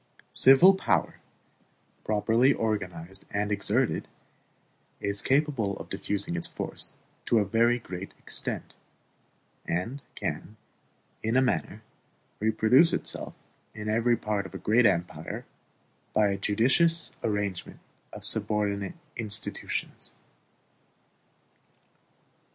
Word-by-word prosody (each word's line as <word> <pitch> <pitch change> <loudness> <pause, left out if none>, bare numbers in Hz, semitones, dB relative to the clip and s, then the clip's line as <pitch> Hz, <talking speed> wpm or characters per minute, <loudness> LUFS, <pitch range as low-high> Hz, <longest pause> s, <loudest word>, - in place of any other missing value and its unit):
Civil 135 +9 +8
power, 190 - 0 0.8
properly 115 +5 +3
organized 95 -6 -3
and 105 +1 -1
exerted, 105 +5 0 0.9
is 100 0 -2
capable 135 -8 +1
of - - -9
diffusing 100 -4 -2
its 85 - -2
force - - -4 0.3
to 115 - +2
a 105 - +3
very 115 +4 +3
great 95 -4 -7
extent; - - -2 0.9
and 115 +12 -2
can, 105 +4 -5 0.6
in 115 +3 +1
a - - +5
manner, 110 -4 -1 0.6
reproduce 110 +9 +4
itself - - -3 0.4
in 105 -1 -6
every 115 +2 +2
part 105 -3 -2
of - - -14
a - - -2
great 115 +2 +4
empire 85 -4 -2 0.7
by 105 -1 +4
a 100 - -1
judicious 135 - +2
arrangement 105 -4 -2 0.3
of - - -8
subordinate 100 -2 +1 0.2
institutions. 110 -2 -1
110 Hz, 100 wpm, -28 LUFS, 100-120 Hz, 0.9 s, Civil